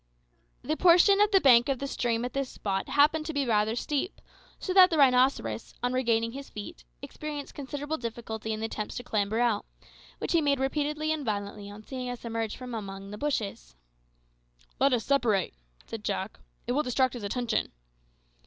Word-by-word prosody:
The 310 Hz, -, -1 dB
portion 360 Hz, +4 st, +6 dB
of 415 Hz, -, +5 dB
the 390 Hz, -2 st, +5 dB
bank 245 Hz, -5 st, +6 dB
of 270 Hz, -, +1 dB
the 275 Hz, -, -4 dB
stream 240 Hz, -3 st, -1 dB
at 250 Hz, -, -5 dB
this 275 Hz, -1 st, -2 dB
spot 195 Hz, -2 st, -3 dB
happened 305 Hz, +2 st, +3 dB
to 320 Hz, -, -3 dB
be 280 Hz, -1 st, +1 dB
rather 220 Hz, -1 st, +2 dB
steep, 295 Hz, -, -2 dB, 0.4 s
so 370 Hz, -, -3 dB
that 375 Hz, -1 st, +8 dB
the 325 Hz, -, 0 dB
rhinoceros, 250 Hz, -, +2 dB
on 245 Hz, 0 st, +1 dB
regaining 230 Hz, -3 st, +1 dB
his 275 Hz, +2 st, -8 dB
feet, 205 Hz, -, -8 dB, 0.2 s
experienced 295 Hz, -2 st, -6 dB
considerable 290 Hz, +2 st, -4 dB
difficulty 225 Hz, -2 st, -5 dB
in 215 Hz, 0 st, -3 dB
the -, -, -1 dB
attempts 215 Hz, -1 st, -5 dB
to 245 Hz, -, -5 dB
clamber 215 Hz, -1 st, -1 dB
out, 235 Hz, -4 st, +2 dB, 0.5 s
which -, -, -4 dB
he 335 Hz, -, +4 dB
made 285 Hz, -2 st, +2 dB
repeatedly 300 Hz, +3 st, -1 dB
and 310 Hz, -2 st, -4 dB
violently 205 Hz, -2 st, -4 dB
on 205 Hz, +1 st, -11 dB
seeing 255 Hz, +1 st, -5 dB
us 245 Hz, -1 st, -7 dB
emerge 225 Hz, -2 st, -2 dB
from 250 Hz, -1 st, -8 dB
among 195 Hz, -2 st, -6 dB
the 210 Hz, -, -6 dB
bushes. 205 Hz, -, -3 dB, 1.0 s
"Let 275 Hz, -, +4 dB
us 240 Hz, -4 st, +1 dB
separate," 235 Hz, -9 st, +2 dB, 0.3 s
said 225 Hz, -2 st, -7 dB
Jack; 195 Hz, -1 st, -3 dB, 0.3 s
"it 245 Hz, -, -2 dB
will 280 Hz, +4 st, +2 dB
distract 255 Hz, -1 st, +1 dB
his 245 Hz, -, -6 dB
attention." 220 Hz, +2 st, -1 dB
245 Hz, 185 wpm, -28 LUFS, 220-285 Hz, 1.0 s, that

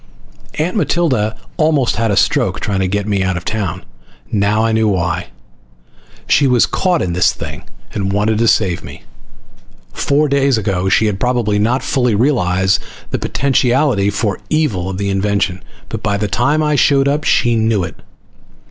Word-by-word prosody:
Aunt 165 Hz, +6 st, -1 dB
Matilda 170 Hz, -, +1 dB
had 110 Hz, +1 st, -3 dB, 0.2 s
almost 155 Hz, -8 st, +1 dB
had 115 Hz, 0 st, 0 dB
a 100 Hz, -, +1 dB
stroke -, -, +1 dB
trying 100 Hz, -2 st, -2 dB
to 95 Hz, -, +1 dB
get 100 Hz, +2 st, -1 dB
me 100 Hz, -2 st, 0 dB
out 95 Hz, -1 st, 0 dB
of 85 Hz, -, -7 dB
town. 105 Hz, -4 st, -3 dB, 0.5 s
Now 105 Hz, +2 st, +1 dB
I 115 Hz, -, +1 dB
knew 110 Hz, 0 st, +2 dB
why. 90 Hz, -4 st, -1 dB, 1.0 s
She 140 Hz, -, +3 dB
was 125 Hz, -3 st, +4 dB
caught 180 Hz, -3 st, 0 dB
in 85 Hz, -, -2 dB
this 90 Hz, -, +3 dB
thing -, -, -8 dB, 0.3 s
and 95 Hz, -2 st, -2 dB
wanted 105 Hz, +2 st, +1 dB
to 115 Hz, -, +2 dB
save 90 Hz, -6 st, +1 dB
me. -, -, -11 dB, 0.9 s
Four 145 Hz, +2 st, +1 dB
days 140 Hz, -2 st, +2 dB
ago 95 Hz, -3 st, -1 dB
she 110 Hz, -, +3 dB
had 100 Hz, -2 st, -1 dB
probably 120 Hz, -4 st, 0 dB
not 125 Hz, +5 st, +1 dB
fully 125 Hz, -5 st, +1 dB
realized 95 Hz, -7 st, +1 dB, 0.3 s
the -, -, -1 dB
potentiality 130 Hz, -5 st, +1 dB
for 100 Hz, 0 st, -2 dB
evil 115 Hz, -, 0 dB
of 95 Hz, -, -5 dB
the 100 Hz, 0 st, -2 dB
invention, 95 Hz, -1 st, -1 dB, 0.3 s
but -, -, -6 dB
by 100 Hz, -, 0 dB
the 105 Hz, +1 st, -1 dB
time 145 Hz, +9 st, +1 dB
I 150 Hz, 0 st, +1 dB
showed 140 Hz, -1 st, +3 dB
up 145 Hz, +2 st, 0 dB
she 120 Hz, -5 st, +2 dB
knew 110 Hz, -3 st, +1 dB
it. -, -, -6 dB
110 Hz, 175 wpm, -16 LUFS, 100-135 Hz, 1.0 s, was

